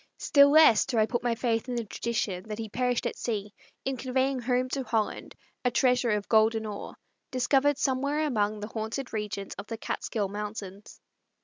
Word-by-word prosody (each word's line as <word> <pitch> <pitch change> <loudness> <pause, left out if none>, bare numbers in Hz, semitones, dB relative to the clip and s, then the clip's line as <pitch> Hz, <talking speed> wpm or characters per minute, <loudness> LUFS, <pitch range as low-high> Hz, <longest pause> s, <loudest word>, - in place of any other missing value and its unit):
Still 280 -1 +5
less 305 -6 +7
do 240 - -1
I 215 - +5
put 240 +1 -2
my 240 -1 0
faith 230 +1 -1
in 245 - -2
the 235 - -1
tradition 215 -4 -3
that 210 -1 -5
he 225 -1 -4
perished 250 +2 0
at - - -2
sea 210 -3 -3 0.3
in 270 -1 -1
conveying 260 +1 0
home 250 +1 0
to 270 - -2
Holland 220 -4 -2 0.3
a 250 - +3
treasure 250 -1 +2
of 210 -2 0
golden 220 0 +3
ore, 210 -1 -6 0.3
discovered 270 +2 +2
somewhere 280 +3 0
among 210 -6 0
the 210 - -4
haunted 225 +4 -4
regions 210 -2 -4
of 200 - -7
the 225 - -5
Catskill 215 -1 -2
Mountains. 205 -1 -7
230 Hz, 185 wpm, -28 LUFS, 210-255 Hz, 0.3 s, less